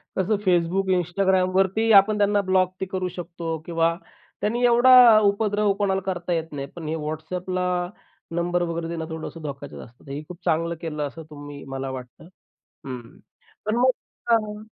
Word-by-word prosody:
कसं 195 +3 +1
Facebook 180 +2 +2
Instagramवरती 190 +4 +2
आपण 210 +2 0
त्यांना 205 0 +3
ब्लॉक 185 -1 +3
ते - - 0
करू 185 -1 -3
शकतो 170 -2 -5
किंवा 165 -1 +1 0.5
त्यांनी 235 +4 0
एवढा 240 -1 +8
उपद्रव 205 0 +2
कोणाला 195 -1 0
करता 175 -2 -2
येत 165 -1 -2
नाही. 140 -2 -5
पण 165 -3 -7
हे 155 - -1
WhatsAppला 175 +4 -3 0.7
नंबर 175 +1 0
वगैरे 170 -1 -3
देणं 165 -1 -4
थोडंसं 160 +1 -7
धोक्याचे 140 -2 -7
असतात. 120 +3 -13
हे 140 +2 -4
खूप 180 - -9
चांगलं 165 +1 +1
केलं 150 -3 -3
असं 160 +3 -10
तुम्ही 145 -1 -9
मला 135 0 -4
वाटतं. 125 -2 -9 0.4
हं, 130 +5 -10 0.5
पण 215 +2 +1
मग 250 +2 +4 0.4
हां. 215 -2 +1
175 Hz, 155 wpm, -24 LUFS, 160-200 Hz, 0.7 s, एवढा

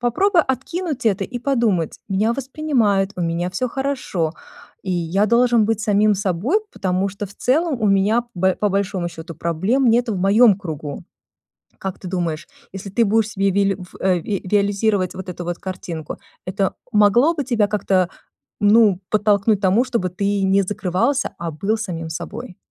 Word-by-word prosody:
Попробуй 340 - +3
откинуть 305 0 -3
это 195 -2 +2
и 245 - -6
подумать: 230 - 0
"Меня 210 +4 +1
воспринимают, 245 -8 0
у 180 - -2
меня 170 +2 -1
всё 190 +8 -1
хорошо, 255 - -2 0.5
и 190 - -4
я 175 +4 +1
должен 235 0 +4
быть 220 -1 0
самим 210 0 +3
собой, 200 - 0
потому 190 +1 -1
что 200 +1 -6
в 205 - -15
целом 285 0 0
у 215 - +2
меня, 205 +4 +3
б 190 +1 +1
по 210 - +1
большому 195 -3 -1
счету, 165 0 -9
проблем 190 - +1
нету 235 0 +2
в 185 - -3
моем 205 +1 +5
кругу". 155 -6 -6 0.7
Как 190 -1 -5
ты 185 - -10
думаешь, 170 -4 -2 0.3
если 195 +1 -7
ты 230 +4 +2
будешь 220 +1 +2
себе 195 0 +1
вили 195 0 +1
ф 180 - -12
э, 185 -2 +2
виализировать 200 0 0
вот 190 0 -7
эту 180 0 -6
вот 175 0 -3
картинку, 170 -4 -6 0.3
это 190 +1 -1 0.2
могло 215 - +4
бы 285 - -2
тебя 225 -5 +1
как-то, 190 -4 +1 0.5
ну, 205 -2 +5
подтолкнуть 210 0 +2
к - - -23
тому, 200 +7 +3
чтобы 235 -8 -1
ты 200 +2 -1
не 195 +1 +3
закрывался, 205 +7 -1
а 170 -1 -3
был 200 +8 -1
самим 170 -7 -5
собой? 185 +5 -7
200 Hz, 170 wpm, -20 LUFS, 185-230 Hz, 0.7 s, моем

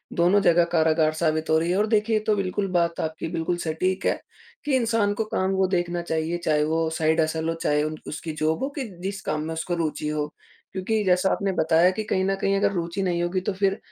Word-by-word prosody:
दोनों 180 +4 +4
जगह 175 -3 +5
कारागार 160 -1 +3
साबित 155 -1 0
हो 160 - +4
रही 170 +2 0
है 185 - +1
और 210 +2 +2
देखिए 215 0 +2
ये 215 - -3
तो 215 - +4
बिल्कुल 195 0 -1
बात, 170 -2 +1
आपकी 160 0 -3
बिल्कुल 170 +1 -1
सटीक 185 +4 -1
है, - - +1 0.5
कि 285 - +2
इंसान 225 -4 +2
को 220 +2 -2
काम 190 -2 -1
वो 190 -1 +2
देखना 175 -1 -1
चाहिए 160 0 -2
चाहे 150 -1 +3
वो 160 +1 0
साइड 160 +1 +3
हसल 160 +1 -1
हो, - - 0
चाहे 150 -2 +1
उन 155 0 -3
उसकी 155 +2 -5
जॉब 160 +7 +1
हो 270 - -1
कि 270 - -1 0.2
जिस 195 0 -4
काम 155 0 -1
में 160 - -3
उसको 170 +2 -2
रुचि 155 -3 -2
हो। 150 +1 -3 0.4
क्योंकि 210 +3 -1
जैसा 185 0 +3
आपने 200 -1 0
बताया 165 0 +3
कि 215 +3 -3
कहीं 190 - +1
न 195 0 +1
कहीं 195 0 +2
अगर 200 - +2
रुचि 170 +1 -3
नहीं 175 -2 0
होगी 175 +2 0
तो - - +1
फिर 195 +1 +1
175 Hz, 235 wpm, -24 LUFS, 160-195 Hz, 0.5 s, जगह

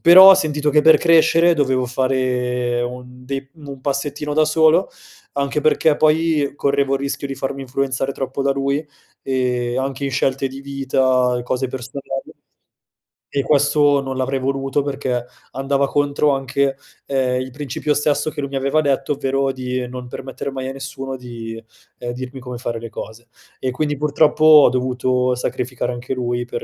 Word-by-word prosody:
però 185 +3 +10
ho - - +9
sentito 150 -5 -1
che 150 +1 +4
per 160 +1 +7
crescere 165 +1 +4
dovevo 130 -4 +1
fare 125 -1 0
un 125 +1 -7
dei 135 0 -4
un 140 -4 -10
passettino 145 +2 -3
da 155 0 +4
solo, 160 +3 +4 0.4
anche 140 +1 -1
perché 155 0 +3
poi 155 -2 +2
correvo 140 -1 +1
il 135 - -2
rischio 140 0 -3
di 135 - -5
farmi 135 +1 -4
influenzare 135 +1 -2
troppo 135 +1 -4
da 140 0 +2
lui, 140 +2 -1 0.4
ehm, 125 -2 -1
anche 135 +1 -3
in 140 - -1
scelte 135 0 0
di 135 +1 -9
vita 130 -2 +1
e - - -5
cose 125 +1 -2
personali, 130 +2 -8 1.2
e 140 -1 -1
questo 145 0 +3
non 135 -1 -5
l'avrei 135 +1 -1
voluto 135 +1 -1
perché 130 -3 -2 0.3
andava 135 +1 0
contro 145 +1 +1
anche, 135 0 0 0.3
ehm, 130 -2 0
il 130 0 -6
principio 145 +2 -2
stesso 145 +1 +1
che - - -8
lui 140 - -4
mi - - -4
aveva 135 +3 +1
detto, 135 -2 0
ovvero 135 0 0
di 125 -1 -3
non 125 0 -7
permettere 130 +2 -6
mai 130 -1 -4
a - - -4
nessuno 135 0 -6
di, 115 -2 -8 0.4
ehm, 120 0 -4
dirmi 130 +1 -7
come 125 -1 -7
fare 120 -1 -4
le 115 0 -8
cose. 110 +2 -9 0.3
E 130 - -1
quindi 145 +3 -2
purtroppo 150 +1 +2
ho 155 -2 +8
dovuto 125 0 0
sacrificare 125 0 -3
anche 120 +2 -5
lui 120 -1 -2
per 120 -1 -5
135 Hz, 170 wpm, -20 LUFS, 125-145 Hz, 1.2 s, però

